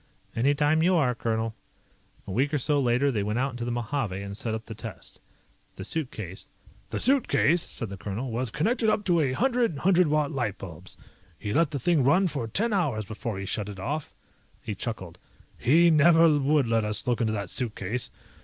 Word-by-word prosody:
"Any 135 +5 +2
time 150 +2 +2
you 180 +3 +3
are, 135 -7 +2
colonel." 115 -1 -2 0.7
A - - -7
week 135 +9 +1
or - - +3
so 145 +2 +1
later, 130 +2 +2
they 110 -5 -1
went 105 +3 -1
out 135 +2 0
into 120 -1 -5
the 120 - -2
Mojave 120 -4 -2
and 100 0 -6
set 110 +1 -3
up 110 - -7
the 110 - -7
test. 110 -4 -9 0.6
The - - -7
suitcase 110 - -5 0.2
"... - - -29
The - - -3
suitcase," 235 - +3
said 115 -8 -5
the 100 - -7
colonel, 105 +8 -4
"was 120 +2 -1
connected 220 - +1
up 210 -1 0
to 175 -2 +3
a 135 -5 +1
hundred 240 - +1
hundred 180 +3 +3
watt 150 0 +1
light 120 -9 -2
bulbs. 90 -1 -9 0.4
He 105 -1 -4
let 165 -1 +3
the 145 - -3
thing 150 +2 +2
run 180 +9 +4
for 140 -8 -3
ten 215 - 0
hours 140 - 0
before 110 +1 -5
he 100 - -5
shut 105 +1 -3
it 100 -2 -8
off." 145 +9 -3 0.5
He - - -3
chuckled. - - -6 0.4
"He 165 +7 +4
never 165 +2 +6
would 145 0 +2
let 115 -1 +1
us 105 +2 0
look 120 -1 +1
into 110 -1 +1
that 100 -4 -4
suitcase. 120 -1 -2
130 Hz, 205 wpm, -27 LUFS, 110-155 Hz, 0.7 s, never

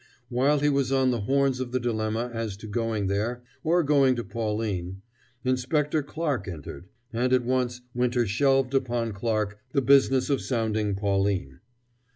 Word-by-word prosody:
While 135 +4 +2
he 145 - +3
was 140 -2 +1
on 130 -1 +3
the 120 -3 -1
horns 135 +3 +1
of 130 -2 -4
the 130 - 0
dilemma 115 0 -1
as 115 -4 -3
to 105 - -11
going 110 -1 -1
there, 110 +5 -1 0.2
or 170 +2 +3
going 140 -3 +4
to 120 - -3
Pauline, 100 -3 -3 0.4
Inspector 140 +4 +1
Clarke 145 - -3
entered: 85 -1 -8 0.3
and 125 +2 0
at 125 -2 +3
once 125 -1 0
Winter 125 0 +1
shelved 135 +4 +2
upon 120 -4 0
Clarke 105 0 -1
the 140 - +3
business 135 0 +4
of 140 - +1
sounding 110 -4 -1
Pauline. 95 -8 -1
120 Hz, 160 wpm, -26 LUFS, 105-135 Hz, 0.4 s, going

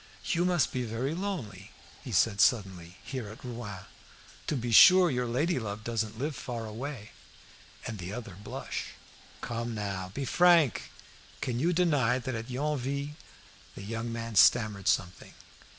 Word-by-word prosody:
"You 175 -1 +2
must 175 -3 +2
be 130 - -1
very 120 +5 -2
lonely," 150 - -5 0.3
he - - -7
said 100 -3 +3
suddenly, 95 -6 +1
"here 125 -4 -5
at 110 +4 -11
Rouen. 115 -6 -7 0.6
To - - 0
be 120 -2 -3
sure 180 - +8
your 125 -1 -1
lady 145 +7 0
love 110 -1 -5
doesn't 110 -2 -2
live 145 +4 -3
far 120 -3 -5
away." 115 0 -7 0.7
And 110 -2 -5
the 90 +1 -6
other 115 -3 -7
blushed - - -6 0.5
"Come 115 0 -4
now, 100 -3 -4
be 140 - -2
frank. 170 -1 +4 0.5
Can 120 -1 -2
you 165 +6 +2
deny 145 -9 +2
that 130 0 -4
at 115 +1 -5
Yonville 140 +1 -2 0.3
" 100 0 -24
The 100 - -8
young 115 +3 -4
man 115 0 -5
stammered 105 -4 +4
something. 90 0 -1
120 Hz, 155 wpm, -29 LUFS, 105-140 Hz, 0.7 s, sure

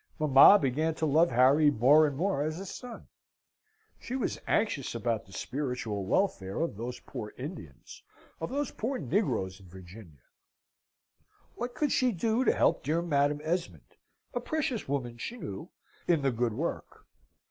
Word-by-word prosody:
Mamma 150 +6 +8
began 155 +2 0
to 160 - -1
love 155 +3 +4
Harry 135 +5 +5
more 145 +4 +5
and 140 -2 -5
more 185 -3 0
as 155 +3 -2
a 195 - -6
son. 240 +5 -9 0.9
She 250 - -6
was 260 - -2
anxious 155 - 0
about 115 -2 -2
the - - -17
spiritual 125 -4 -4
welfare 100 - 0
of 165 -9 -2
those 120 +4 -6
poor 105 -1 -8
Indians, 130 - -9 0.4
of 165 - -4
those 285 0 -2
poor 255 +5 -3
negroes 125 - -1
in 95 - -16
Virginia. 90 - -13 1.3
What 245 +1 -5
could 295 -3 0
she 255 -1 +2
do 225 +7 0
to - - +4
help - - +2
dear 160 +5 0
Madam 145 -2 +1
Esmond 175 +2 -4 0.4
(a 245 - -1
precious 260 -2 -2
woman, 120 -4 -3
she 240 - -5
knew!) 100 - -7 0.4
in 165 -5 +2
the 135 - +2
good 120 -1 -1
work? 155 +9 -5
145 Hz, 160 wpm, -29 LUFS, 120-190 Hz, 1.3 s, Mamma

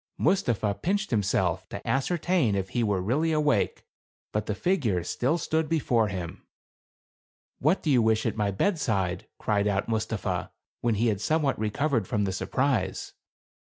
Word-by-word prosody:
Mustapha 110 - +1
pinched 195 - -1
himself 95 -5 0
to 100 - -7
ascertain 155 - +1
if 95 -1 -2
he 120 +3 0
were 100 -3 +1
really 150 - +1
awake, 150 -8 +1 0.5
but 105 0 -2
the 105 - -1
figure 120 - +1
still 130 - 0
stood 160 -1 -1
before 125 -9 +2
him. 90 -4 -6 0.6
" - - - 0.3
What 155 +8 +2
do 155 - +1
you 125 -3 +5
wish 110 -1 +2
at - - 0
my 105 -2 0
bed 165 - 0
side?" 95 - -1
cried 105 -1 +1
out 100 -1 0
Mustapha, 110 -5 -2 0.3
when 115 -2 +1
he 110 +4 +1
had 100 -2 -1
some 155 +6 +1
what 135 -6 0
recovered 115 0 0
from 105 - 0
the 95 -1 -1
surprise. 110 -1 -1
110 Hz, 165 wpm, -27 LUFS, 100-150 Hz, 0.6 s, you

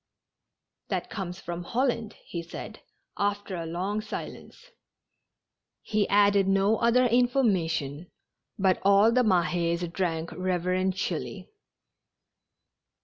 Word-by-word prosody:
" - - -59
That - - -3
comes 185 -3 -5
from 175 0 -5
Holland," 235 0 -1
he 170 - -5
said, 170 - -9 0.4
after 205 -1 -1
a 165 -1 -4
long 190 +6 -2
silence. - - -8 1.1
He 210 -1 0
added 200 -1 +4
no 195 +3 +3
other 240 +2 +3
information, 185 - +1 0.5
but 190 -2 +2
all 200 +3 +5
the 250 +2 +3
Mahes 175 -3 +1
drank 165 -4 -2
reverentially. 185 - -2
195 Hz, 100 wpm, -27 LUFS, 175-215 Hz, 1.1 s, all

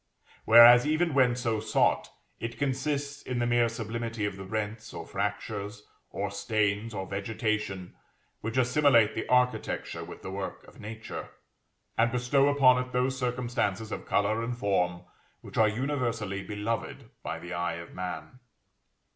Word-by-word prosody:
Whereas, 120 +3 +9
even 160 +1 +1
when 130 -3 +4
so 115 -3 -1
sought, 110 0 +1 0.3
it 115 0 -5
consists 140 +1 -2
in 125 - -4
the 120 - +1
mere 120 -1 +3
sublimity 115 -1 -4
of 100 -2 -3
the 95 0 -8
rents, 110 +2 -4
or - - -6
fractures, 105 +1 -4 0.2
or - - -3
stains, 105 0 0
or 95 -1 -3
vegetation, 100 -1 -3 0.5
which 115 +3 -4
assimilate 125 -3 +4
the 110 - -4
architecture 125 0 0
with - - -10
the 95 - -5
work 95 0 -6
of - - -16
Nature, 110 +1 -7 0.7
and 115 +1 +4
bestow 130 +3 +3
upon 130 -3 +5
it 125 - -13
those 125 +1 +1
circumstances 120 -4 -2
of - - -5
color 110 +2 +1
and 120 +1 -3
form 90 -5 0 0.4
which - - -10
are 110 -1 +6
universally 115 -5 -2
beloved 105 +1 -4
by - - -4
the 90 +1 -8
eye 85 -1 -1
of 85 0 -9
man. 90 +7 -6
115 Hz, 150 wpm, -28 LUFS, 105-125 Hz, 0.7 s, Whereas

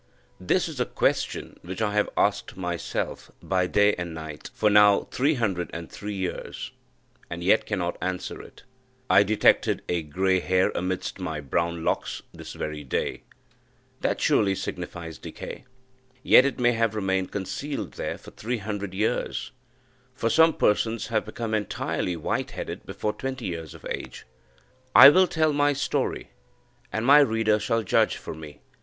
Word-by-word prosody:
This 170 - +1
is 155 -5 -7
a 125 - +2
question - - -1
which 95 +4 -7
I 105 -2 0
have 105 0 +2
asked - - 0
myself, 90 -2 -3
by 90 -1 0
day 105 +2 +4
and 85 -2 -4
night, 80 -2 -8
for 110 - 0
now 105 -1 +6
three 145 +4 +2
hundred 95 - -1
and 85 -1 -7
three 105 0 -6
years, 95 -2 -5 0.6
and 85 0 -5
yet 100 +5 +3
cannot 90 -4 -2
answer 95 0 -3
it. - - -15 0.5
I 95 +2 +7
detected 105 +1 +3
a 85 -1 0
grey 95 +5 +1
hair 95 +1 +2
amidst 90 +1 -3
my 80 -4 -3
brown 85 +4 -2
locks - - -1
this - - -9
very 75 -1 -5
day 65 - -2 0.8
that - - -1
surely 100 -2 +3
signifies 85 -4 -6
decay. - - -8 0.6
Yet 130 - +7
it 140 - -1
may 120 0 +4
have 115 -2 0
remained 95 -2 -1
concealed 140 +9 -4
there - - -4
for - - -13
three 120 +3 -3
hundred 100 -2 -5
years 110 +5 -1 0.6
for 115 -3 0
some 160 0 +5
persons 110 +1 +1
have - - 0
become 115 -2 -5
entirely 105 -4 -1
white 80 - -2
headed - - -6
before 105 - -2
twenty 130 -2 -5
years 80 -4 -5
of - - -14
age. - - -6 0.7
I 140 - +12
will 185 +5 +5
tell 155 -3 +1
my 145 0 +3
story, 140 - -2 0.6
and 110 +1 -2
my 145 +3 +8
reader 110 -5 +3
shall 115 +2 0
judge 95 - +2
for - - -7
me. 75 -2 -11
100 Hz, 160 wpm, -26 LUFS, 90-115 Hz, 0.8 s, I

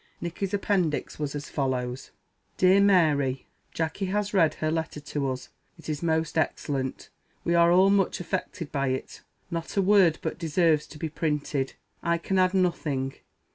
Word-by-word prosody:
Nicky's 175 +3 -4
appendix 195 -8 0
was 150 -1 -3
as 145 0 -5
follows: 130 -2 -2 0.5
"DEAR 185 +2 +5
MARY 150 -9 +3 0.3
Jacky 165 +4 -2
has 205 +2 -1
read 165 -6 +3
her 155 0 -1
letter 160 -2 -2
to 145 -1 -3
us. 130 0 -6 0.3
It 165 - -10
is 150 -1 -2
most 160 -1 0
excellent. 135 -3 -2 0.3
We 170 - +1
are 170 0 +5
all 190 +2 +6
much 200 -2 +2
affected 180 -2 -4
by 140 -2 0
it. 130 0 -4 0.3
Not 165 +3 -4
a - - +5
word 190 -5 +5
but 160 - -3
deserves 165 -2 +2
to 150 - -12
be 160 - -3
printed. 150 -3 -2 0.3
I 170 0 +1
can 190 +3 -1
add 185 +1 +3
nothing. 150 -7 0
160 Hz, 165 wpm, -27 LUFS, 145-185 Hz, 0.5 s, all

